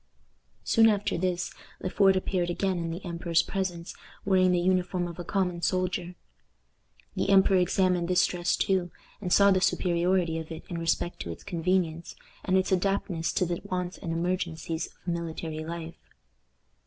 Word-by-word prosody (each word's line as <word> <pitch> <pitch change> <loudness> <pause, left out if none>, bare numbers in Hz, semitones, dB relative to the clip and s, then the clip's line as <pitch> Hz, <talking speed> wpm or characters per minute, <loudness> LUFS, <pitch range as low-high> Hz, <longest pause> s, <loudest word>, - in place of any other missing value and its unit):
Soon 225 0 +5
after 205 -1 0
this 180 0 -1 0.3
Le - - -3
Fort 195 -2 +4
appeared 185 -1 0
again 185 +1 -1
in 165 -1 -3
the 170 +4 -6
emperor's 170 -1 +1
presence 180 -3 -3 0.3
wearing 185 -2 +4
the 180 - +2
uniform 180 0 +1
of 170 0 -9
a - - -3
common 180 -2 -1
soldier. 180 0 -1 1.0
The - - -1
emperor 195 -1 +5
examined 180 -1 +2
this 180 0 +4
dress 175 0 0
too, 185 -3 +1 0.3
and 180 -3 -4
saw 200 +1 +6
the 185 -1 +3
superiority 175 -2 +1
of 160 0 -8
it 160 - -7
in 170 - -4
respect 165 +1 -1
to 85 - -5
its 85 - -9
convenience, 170 -1 -1 0.3
and 190 -1 +2
its 185 - 0
adaptedness 185 -3 0
to 185 - +2
the 175 0 -3
wants 180 -2 -4
and 165 - -4
emergencies 165 -1 -2
of - - -24
military 165 -2 -3
life. 165 0 -7
180 Hz, 165 wpm, -28 LUFS, 170-185 Hz, 1.0 s, saw